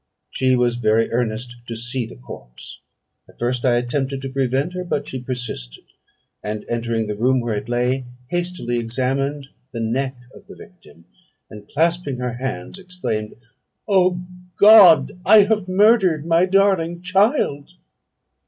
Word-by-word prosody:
She 130 -1 +1
was 120 -1 +1
very 115 -1 +1
earnest 120 +1 -3
to 115 - -5
see 120 +1 -3
the - - -12
corpse. - - -12 0.5
At - - -20
first 120 +1 -2
I 125 -3 +3
attempted 135 +2 -2
to 135 - -4
prevent 135 +5 -1
her; 180 0 -4
but 145 -4 -3
she 130 - -6
persisted, 125 - -6 0.6
and 105 0 -5
entering 115 -1 -2
the 105 - -3
room 125 +5 +2
where 120 -2 -2
it 105 +2 -5
lay, 125 +2 0 0.3
hastily 175 -9 -2
examined 135 +4 -2 0.2
the 115 - -5
neck 130 +4 -2 0.2
of 200 - -16
the 195 - -12
victim, 85 - -17 0.5
and 105 -1 -12
clasping 165 -3 0
her 125 -1 -3
hands 130 +9 -6
exclaimed, 180 - -5 0.5
'O 180 -3 +2 0.3
God! 180 -7 +7
I 210 +2 +7
have 210 -2 0
murdered 185 -5 +3
my 170 +2 +3
darling 185 -3 +1
child!' 185 - +1
130 Hz, 145 wpm, -20 LUFS, 120-180 Hz, 0.6 s, God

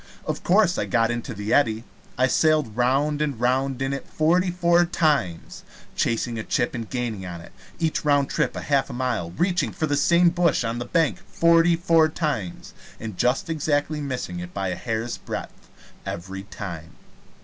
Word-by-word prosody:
Of - - -3
course 185 -1 +3
I - - 0
got 115 -2 +2
into 120 0 -4
the 105 +2 -2
eddy. 115 -5 +2 0.3
I 130 - +4
sailed 150 -4 +2
round 140 +5 +1
and 145 -6 -1
round 130 +2 +1
in 135 +1 -1
it 140 - -5
forty 175 +4 +2
four 175 -1 +3
times 150 - -1 0.3
chasing 115 0 -1
a - - -3
chip 120 - 0
and 115 -3 -5
gaining 120 -6 -3
on 90 -2 -6
it 85 - -13 0.3
each 160 -1 -1
round 145 -2 +3
trip - - -1
a - - -4
half 140 -2 +1
mile 120 -9 -2
reaching 175 - 0
for 155 - -2
the 145 -2 0
same 170 +4 +4
bush 170 -6 +2
on 115 +1 -2
the 120 - -4
bank 160 +3 +1
forty 170 0 +4
four 165 -2 +3
times, 140 - -3 0.3
and 110 -3 -6
just 125 +7 +1
exactly 150 -1 -1
missing 125 -11 -4
it 90 0 -8
by 95 -1 -1
a 90 - -2
hair's 115 +2 -3
breadth - - -7 0.3
every 95 +3 -6
time. 85 -6 -8
135 Hz, 180 wpm, -24 LUFS, 110-155 Hz, 0.3 s, I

